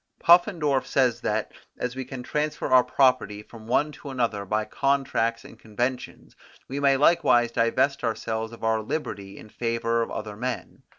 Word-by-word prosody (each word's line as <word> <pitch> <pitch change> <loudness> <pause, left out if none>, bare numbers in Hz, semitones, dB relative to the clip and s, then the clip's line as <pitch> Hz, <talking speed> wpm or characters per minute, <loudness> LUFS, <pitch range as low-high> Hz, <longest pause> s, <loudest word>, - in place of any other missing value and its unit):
Puffendorf 170 -6 +4
says 125 -3 +1
that, 105 +1 -1 0.3
as 125 0 -3
we 130 0 -5
can 130 -1 -7
transfer 150 +3 -2
our 130 -1 +6
property 125 -7 +1
from 110 0 -14
one 150 +5 +1
to 145 - -10
another 115 -6 -1
by 105 +2 -1
contracts 135 -5 0
and - - -14
conventions, 120 +4 -4 0.3
we 135 +2 -4
may 140 -1 +3
likewise 120 -6 +4
divest 120 +5 +1
ourselves 110 -1 -2
of 115 - -12
our 110 0 +1
liberty 100 -6 -5
in 110 - -12
favour 115 0 -1
of 115 - -2
other 105 -1 -6
men. 125 +2 -5
120 Hz, 165 wpm, -25 LUFS, 110-135 Hz, 0.3 s, our